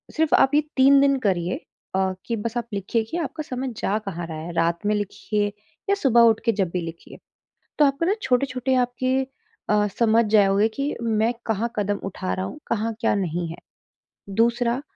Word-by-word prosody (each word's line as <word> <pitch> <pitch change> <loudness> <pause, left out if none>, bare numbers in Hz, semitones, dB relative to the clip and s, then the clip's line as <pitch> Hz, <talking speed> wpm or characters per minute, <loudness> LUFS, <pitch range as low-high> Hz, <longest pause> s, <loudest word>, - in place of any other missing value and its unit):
सिर्फ़ 320 -1 +3
आप 270 - +4
ये 300 - +5 0.2
3 275 +1 +7
दिन 275 -1 +4
करिए 185 -5 0 0.4
अ, 190 0 +1
कि 235 - -1
बस 230 +2 -4
आप 235 -1 -3
लिखिए 200 +3 -1
की 335 - -2
आपका 315 -1 -3
समय 260 -2 -4
जा 205 - 0
कहाँ 175 -3 -5
रहा 160 -1 -6
है, 160 +2 -6
रात 170 +1 +1
में 210 - +2
लिखिए 205 +1 -1 0.4
या 400 - +4
सुबह 260 - +4
उठ 225 -2 +5
के 230 - +4
जब 195 -4 0
भी 180 - -1
लिखिए। 165 0 -9 0.6
तो 300 - +6
आपको 280 +4 +1
ना 390 - +3
छोटे-छोटे 255 0 0
आपके 255 +1 0 0.6
अ, 210 0 +3
समझ 230 0 +4
जाओगे 205 0 +4
कि 275 +6 -3
मैं 225 0 +1
कहाँ 225 +1 -1
कदम 205 -1 0
उठा 185 -1 -3
रहा 185 - -3
हूँ, 290 - -8
कहाँ 225 0 -1
क्या 230 - +2
नहीं 175 -3 -2
है। 165 - -7 0.8
दूसरा, 235 +2 +2
225 Hz, 195 wpm, -23 LUFS, 195-255 Hz, 0.8 s, 3